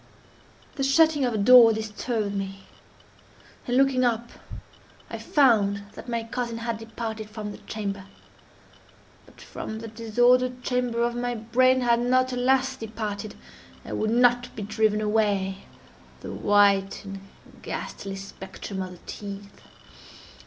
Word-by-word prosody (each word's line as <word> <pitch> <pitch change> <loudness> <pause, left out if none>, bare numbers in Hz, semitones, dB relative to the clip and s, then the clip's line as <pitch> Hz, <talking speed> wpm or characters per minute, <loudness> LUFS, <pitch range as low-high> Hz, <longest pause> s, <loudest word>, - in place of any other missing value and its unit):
The 275 - -1
shutting 295 0 +4
of 245 - -1
a - - 0
door 230 +2 +8
disturbed 215 0 -3
me, 195 -1 -5 1.1
and, 245 0 +1
looking 270 -1 +3
up, 235 -1 0 0.8
I - - -5
found 210 -8 +3
that 245 - -10
my 235 -1 -1
cousin 235 0 -4
had 230 -1 -3
departed 225 -1 -6
from 215 -1 -6
the - - -10
chamber. 200 -3 -5 1.2
But - - -19
from 220 - -7
the 225 +1 -7
disordered 245 +3 +2
chamber 250 -2 0
of 240 0 0
my 245 0 -2
brain, 255 +3 +3
had 235 -1 +3
not, 255 +1 +2
alas! 260 +1 +2
departed, 215 -3 -5 0.5
and - - -4
would 215 - 0
not 245 +1 +3
be 210 - -5
driven 215 +1 +1
away, 205 -3 0 0.6
the - - -7
white 200 -1 +2
and 195 0 -7 0.4
ghastly 195 -1 -6
spectrum 195 0 -7
of 185 -1 -6
the 175 - -14
teeth. 200 -1 -8
225 Hz, 135 wpm, -25 LUFS, 205-245 Hz, 1.2 s, door